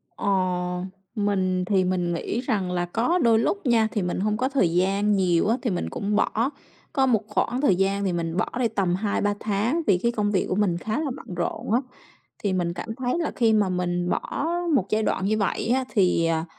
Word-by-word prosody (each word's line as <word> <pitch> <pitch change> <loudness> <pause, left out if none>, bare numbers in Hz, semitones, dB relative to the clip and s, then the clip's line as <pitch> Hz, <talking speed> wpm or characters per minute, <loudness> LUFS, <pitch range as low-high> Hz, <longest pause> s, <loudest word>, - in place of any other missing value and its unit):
Ờ, - - -4 0.9
mình 190 -3 0
thì 190 -1 +2
mình 180 -1 0
nghĩ 185 +6 -2
rằng 205 -8 -1
là 175 -1 0
có 230 - +1
đôi 230 -6 +4
lúc 395 - -1
nha. 230 -3 +3
Thì 210 - -1
mình 180 0 -2
hông 210 +2 0
có 255 +3 0
thời 225 -12 +1
gian 195 +3 +2
nhiều 180 -2 +2
á, 230 +3 +2
thì 240 - -1
mình 180 -4 -2
cũng 205 +1 -2
bỏ. 230 +5 +1 0.4
Có 270 -2 +3
một 225 -5 +2
khoảng 240 +4 -1
thời 205 -11 +4
gian 195 +2 0
thì 190 -3 0
mình 165 0 -2
bỏ - - +1
đi 245 - +3
tầm 195 -5 0
2-3 205 +1 0
tháng, 220 +10 0
vì 195 - +5
cái 235 - +3
công 210 -3 0
việc 190 - +1
của - - 0
mình 190 -4 +1
khá 215 - -2
là 300 -4 -2
bận 180 - -9
rộn 175 +4 -3
á, 245 - +3 0.6
thì 200 -2 +1
mình 175 -2 0
cảm 205 +6 -6
thấy 255 +5 -1
là 330 - -1
khi 225 -2 +3
mà 210 -3 +3
mình 175 -1 -1
bỏ 315 - -2 0.3
một 195 -8 +2
giai 215 +1 +1
đoạn 190 - 0
như 215 +2 +1
vậy 205 +1 -1
á, 260 -1 0
thì 180 -5 +2
à, 165 -1 0
205 Hz, 230 wpm, -25 LUFS, 180-230 Hz, 0.9 s, vì